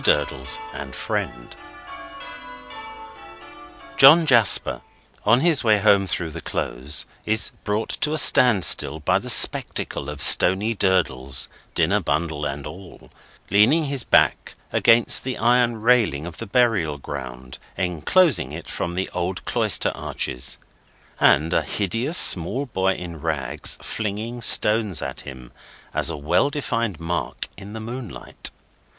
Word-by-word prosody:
DURDLES - - 0 0.2
AND - - -8
FRIEND - - -5 2.4
John 150 +5 +7
Jasper, 120 -7 +4 0.4
on 120 +4 +4
his 160 -5 +2
way 110 -2 +3
home 100 -1 +3
through 85 -3 -3
the - - -8
Close, 65 +5 -2 0.2
is 110 +1 +1
brought 105 +1 -2
to 150 - +1
a - - -1
stand 125 - +4
still 75 0 +2
by 75 - +1
the - - -6
spectacle 70 0 +2
of 75 -1 -8
Stony 95 +10 +3
Durdles, 70 - -1 0.3
dinner - - +1
bundle 80 -3 -3
and 70 -1 -5
all, 90 +4 -12 0.4
leaning 115 +11 +4
his 140 -3 -2
back - - +1 0.2
against 115 0 +3
the 130 -1 -4
iron 120 0 +1
railing 115 - +2
of 85 -2 -9
the 115 - -7
burial 100 - +1
ground 65 -3 -9 0.2
enclosing 90 - +1
it 80 +2 -9
from 85 0 -5
the 95 +1 -2
old 90 +1 -4
cloister - - 0
arches; 60 - -3 0.6
and 80 +4 +3
a - - +2
hideous 115 - -1
small 100 +11 +3
boy 95 -6 -1
in 85 -3 -9
rags 70 -6 -2
flinging 110 +3 -5
stones 105 -4 +3
at - - -6
him 65 -3 -11 0.4
as - - +1
a 80 - -4
well 85 - +1
defined 115 - -3
mark 80 -7 -4
in 100 +2 -11
the 110 - -7
moonlight. 115 -1 -5
95 Hz, 135 wpm, -22 LUFS, 80-120 Hz, 2.4 s, John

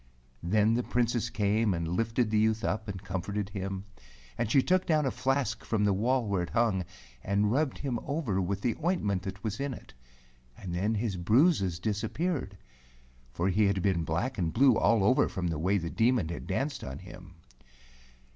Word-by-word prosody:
Then 105 +5 +2
the 120 - +1
Princess 120 -1 0
came, 105 -1 +1
and 85 -1 -3
lifted 110 +6 0
the 110 - +3
youth 110 +1 +1
up 110 +3 -2
and 95 -1 -6
comforted 95 +2 -3
him, 95 -1 -5 0.5
and 115 -2 -1
she 135 +3 +4
took 185 +1 +2
down 155 -3 +2
a 130 - +1
flask 125 -3 -1
from 110 -2 0
the 100 -1 +3
wall 120 +5 +1
where 100 -3 0
it 85 - -4
hung, 110 -6 +1 0.4
and 100 +1 +1
rubbed 140 +2 0
him 130 -5 -2
over 135 - -1
with 95 +2 -2
the 120 0 0
ointment 105 - 0
that 95 0 -7
was 110 -1 -3
in 140 -2 -2
it, - - -14 0.6
and 90 -3 -6
then 100 +6 0
his 105 -3 -2
bruises 100 - +3
disappeared 110 - -2 0.4
— 60 0 -30
for 90 +3 +1
he 105 +3 +3
had 95 -2 0
been 95 -4 +1
black 95 - -2
and 80 -3 0
blue 130 0 +5
all 115 -2 +3
over 115 +6 +3
from 90 -2 -2
the 80 -3 -3
way 95 +5 +2
the 85 -3 -3
Demon 115 -7 +2
had 85 - -6
danced 135 +9 -2
on 65 +1 -6
him. 90 0 -12
105 Hz, 195 wpm, -29 LUFS, 95-120 Hz, 0.6 s, blue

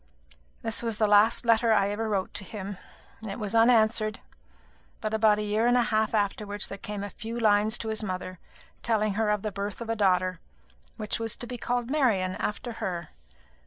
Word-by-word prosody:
This 225 -1 0
was 230 -3 -2
the 215 - +3
last 210 +4 +4
letter 230 0 +4
I 200 -2 +3
ever 220 +2 -2
wrote 195 -3 -1
to - - -1
him. 200 -2 -7 0.4
It 205 -3 -5
was 210 -2 -4
unanswered; 225 -2 +3 0.8
but 215 - -3
about 215 -1 +4
a 210 - -2
year 210 +3 +1
and 245 0 +4
a 245 - +4
half 220 -1 +1
afterwards 205 0 -1
there 195 - -7
came 205 -1 -5
a 205 - -6
few 230 +4 -6
lines 215 0 +3
to 225 - -5
his 220 0 -2
mother, 185 -2 -5 0.4
telling 215 -3 +1
her 215 +1 0
of 210 -1 0
the 215 - -2
birth 200 +1 -4
of 230 -1 -4
a - - 0
daughter, 185 -3 +2 0.6
which 215 0 -3
was 225 -1 -3
to - - -7
be 245 0 -6
called 245 0 -2
Marian, 210 -11 +2
after 225 +3 -3
her. 170 -3 -3
215 Hz, 200 wpm, -27 LUFS, 205-225 Hz, 0.8 s, last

